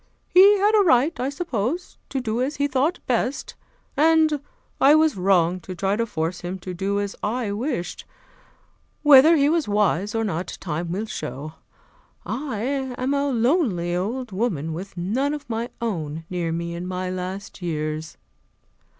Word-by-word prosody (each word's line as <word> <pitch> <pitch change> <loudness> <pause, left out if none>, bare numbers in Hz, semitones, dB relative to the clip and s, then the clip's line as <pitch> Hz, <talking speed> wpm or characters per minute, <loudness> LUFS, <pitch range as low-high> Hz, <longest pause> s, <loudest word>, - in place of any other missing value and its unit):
He 395 +3 +7
had 410 +2 +3
a 420 -2 +5
right, 300 -1 +3
I 255 +2 0
suppose, 280 - -3
to 270 - -2
do 230 -1 -2
as 275 +4 -1
he 285 - +1
thought 285 +5 +1
best, 250 +2 -1 0.4
and 315 -1 +4 0.4
I 285 +3 +7
was 310 -1 +3
wrong 185 -2 +2
to 185 +1 -8
try 195 +2 0
to 230 +1 -1
force 165 -2 -3
him 180 +2 -4
to 185 0 -6
do 195 +3 -1
as 200 -1 -3
I 225 0 -1
wished. 220 - -3 1.0
Whether 295 +2 +8
he 285 -2 +3
was 320 -3 +1
wise 205 0 +1
or 225 - +1
not, 180 -4 -3
time 165 0 -3
will 200 +5 -2
show. 150 - -6 0.7
I 255 -6 -3 0.4
am 260 +2 0
a 280 0 +1
lonely 230 - +1
old 230 +6 -3
woman 185 - -1
with 185 +4 -8
none 255 +12 0
of 295 - -9
my 230 +1 -3
own 165 -8 -3
near 175 -2 -1
me 170 +1 -3
in 175 +1 -5
my 185 0 -3
last 185 +2 -6
years. 155 -2 -3
215 Hz, 165 wpm, -23 LUFS, 180-280 Hz, 1.0 s, Whether